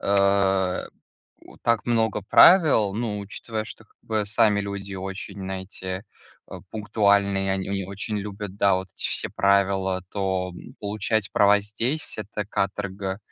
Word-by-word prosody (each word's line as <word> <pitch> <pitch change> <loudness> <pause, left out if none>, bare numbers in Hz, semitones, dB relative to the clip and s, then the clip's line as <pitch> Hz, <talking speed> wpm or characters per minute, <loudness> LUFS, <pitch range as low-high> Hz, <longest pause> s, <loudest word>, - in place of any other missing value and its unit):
э, 100 -2 +2 0.6
у - - -16
так 115 -1 +1
много 110 -3 +1
правил. 135 - +6
Ну, 110 -2 -2
учитывая, 110 +2 -5
что 110 - -10
как - - -33
бы 110 -2 -1
сами 105 0 +3
люди 100 -1 -5
очень, 95 +1 -6
знаете, 95 0 -5 0.5
э, - - -7 0.2
пунктуальные, 100 -2 +2
они 95 0 -2
они 100 -1 -2
очень 100 +3 -4
любят, 100 -1 -6
да, 100 -2 +4
вот 95 0 -5
эти - - -1
все - - 0
правила, 95 -1 +2
то 95 -2 -2 0.3
получать 105 0 -1
права 100 0 +5
здесь- 115 +9 -2
это 105 0 -4
каторга, 100 -1 -2
100 Hz, 140 wpm, -24 LUFS, 95-105 Hz, 0.6 s, правил